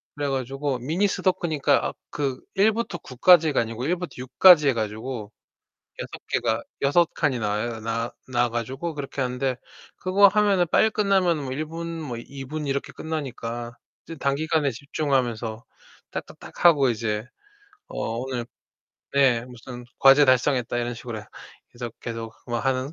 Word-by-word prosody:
그래 145 -1 -2
가지고 135 0 -2
미니 165 +11 +1
스도쿠니까 175 -6 +1
아 - - -9 0.2
그 135 -3 -2
1부터 215 -1 +2
9까지가 155 +1 +4
아니고 115 +2 -4
1부터 180 +2 -2
6까지 145 +5 +6
해 135 - +3
가지고 110 0 -4 0.7
6 - - -6
개가 - - 0 0.2
6 165 +5 +4
칸이 145 -5 +1
나와요. 110 +1 -2
나 115 +1 -2 0.2
나와 120 -1 +1
가지고 130 +8 -4
그렇게 140 -1 -4
하는데 125 0 -1 0.4
그거 195 +2 +5
하면은 200 -3 +3
빨리 220 - +4
끝나면 190 -7 +2
뭐 130 - -4
1 150 +4 -2
분 165 +2 -6 0.2
뭐 125 -6 -5
2 135 +3 -8
분 150 +2 -4
이렇게 140 0 -2
끝나니까 120 -6 -5 0.3
이제 165 - -8
단기간에 145 +1 +1
집중하면서 120 -4 -2 0.5
딱딱딱하고 145 -7 +2
이제 110 -2 -2 0.6
어 115 +1 -4
오늘 125 -1 -3 0.7
네. 130 -4 +3
'무슨 125 0 -10
과제 135 +2 +7
달성했다.' 130 -2 +2
이런 120 0 -2
식으로 115 -2 -7 0.5
계속, 120 -1 -7
계속 115 -1 -5
뭐 120 -1 -1
하는 130 +3 -1
135 Hz, 295 characters per minute, -25 LUFS, 120-155 Hz, 0.7 s, 과제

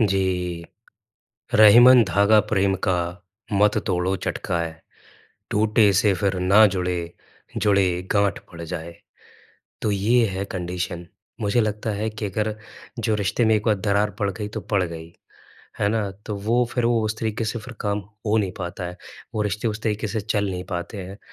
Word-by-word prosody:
जी। 90 -4 0 0.9
रहीमन 120 +4 +8
धागा 100 +3 +4
प्रेम 95 -2 +2
का 90 -1 +2 0.6
मत 105 +1 +3
तोड़ो 90 0 0
चटकाए, 85 -3 -3 0.8
टूटे 105 0 +3
से 105 -2 +3
फिर 95 +1 -1
ना 100 +4 +6
जुड़े, 90 -1 -1 0.6
जुड़े 100 -3 +3 0.2
गाँठ 100 -2 +2
पड़ 85 -1 -9
जाए। 85 +1 -6 0.9
तो 105 - 0
ये 115 +5 +3
है 95 0 -3
कंडीशन। 90 -1 -4 0.3
मुझे 105 +3 +2
लगता 105 +1 -2
है 105 +2 -2
कि 110 0 -5
अगर 105 +2 -2 0.4
जो 110 -1 +1
रिश्ते 105 +3 0
में 110 - +4
एक 105 - -1
बार 110 -2 +3
दरार 100 +1 +1
पड़ 100 - +1
गई 105 +2 -5
तो 105 - -6
पड़ 100 -3 0
गई। 85 -1 -7 0.7
है 100 - +3
ना? 105 -2 -1
तो 105 +2 -7
वो 115 +5 +1
फिर 120 -2 0
वो 115 -2 +2
उस 110 0 -2
तरीके 110 0 -2
से 115 +2 -2
फिर 120 +2 -10
काम 105 -1 -1 0.3
हो 105 +1 +2
नहीं 100 -4 -1
पाता 90 0 -5
है 90 +1 -6 0.4
वो 110 - 0
रिश्ते 105 +2 -1
उस 110 0 -5
तरीके 110 -1 -1
से 110 0 -2
चल 105 -2 -1
नहीं 90 -1 -5
पाते 90 +3 -5
हैं। 95 +2 -8
100 Hz, 170 wpm, -23 LUFS, 90-110 Hz, 0.9 s, रहीमन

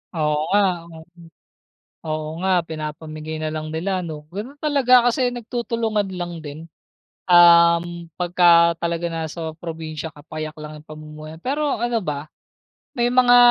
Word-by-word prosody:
Oo 150 -1 +1 0.2
nga, 205 - +5 0.3
oo. 160 -1 -12 1.0
Oo 155 -1 -3
nga, 185 -1 +2
pinapamigay 155 0 -6
na 155 - -2
lang 155 0 -5
nila 185 +4 -1
'no, 155 -2 -7
gano'n 215 +9 -6
talaga 260 -5 +4
kasi 255 +1 +1
nagtutulungan 230 -3 -2
lang 175 -1 -5
din. 155 +3 -9 0.6
Um, 170 -1 +5
pagka 170 -1 +4
talaga 170 0 -2
nasa 160 0 -4
probinsya 160 -2 -6
ka 145 - -14
payak 155 -1 -6
lang 150 0 -8
'yung 150 - -17
pamumuhay, 155 0 -10
pero 285 -2 -1
ano 240 -1 +1
ba, 150 0 -4 0.7
may 240 - +3
mga 245 0 +5
170 Hz, 140 wpm, -22 LUFS, 155-205 Hz, 1.0 s, nga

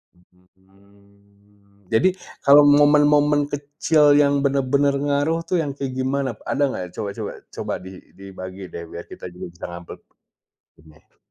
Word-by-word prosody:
Mmm. 100 +2 -28
Jadi 115 +12 +4 0.4
kalau 140 +1 +8
momen-momen 145 0 +4
kecil 145 +2 0 0.2
yang 140 -1 +3
bener-bener 140 +1 +2
ngaruh 145 +3 +1
tuh, 180 - 0
yang 145 -3 -3
kayak 135 -2 -4
gimana? 135 +1 -1 0.2
Ada 145 - +1
gak 90 - -4
coba 100 - -4
coba 105 -2 -4 0.2
coba - - -4
di 95 - -9 0.3
dibagi 95 -1 -9
deh, 85 - -6
biar 85 - -8
kita - - -10
juga 90 - -8
bisa 85 - -9
ngambil 85 0 -9 0.8
bener. 80 -1 -22
110 Hz, 140 wpm, -22 LUFS, 95-145 Hz, 0.8 s, kalau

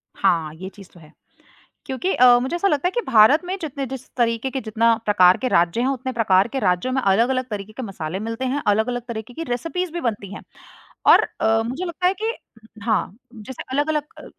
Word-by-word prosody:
हाँ, 165 -5 +1
ये 185 +3 -8
चीज़ 195 -2 -15
तो 175 - -16
है। 155 -1 -17 0.7
क्योंकि 315 +9 -2
अ, 245 -1 +6
मुझे 260 +7 -3
ऐसा 395 +3 +1
लगता 295 0 +1
है - - -1
कि 480 - -1
भारत 250 +6 +6
में 375 +2 -3
जितने 280 -3 -4
जिस 260 0 -8
तरीके 230 +2 0
के 265 - -2
जितना 230 +1 +2
प्रकार 185 -3 +5
के 255 - -2
राज्य 175 +3 +2
हैं 255 - +1
उतने 260 -1 -2
प्रकार 200 -3 +3
के 270 +2 -4
राज्यों 185 +6 0
में 265 - +1
अलग-अलग 240 +6 +2
तरीके 210 0 -6
के 260 - -7
मसाले 185 -3 -5
मिलते 230 +4 -4
हैं, 280 +3 -1
अलग-अलग 220 +4 +1
तरीके 225 +1 -7
की 330 - -5
रेसिपीज़ 330 +8 -3
भी 345 - -4
बनती 205 -4 -3
हैं। - - -8 0.7
और - - +8 0.2
अ, 225 0 +3
मुझे 270 +10 -4
लगता 360 +1 -1
है 375 - +2
कि 450 +1 0 0.5
हाँ, 220 -2 -1 0.2
जैसे 225 +4 -8
अलग-अलग 295 +1 0 0.2
अ, - - -12
240 Hz, 215 wpm, -22 LUFS, 205-270 Hz, 0.7 s, और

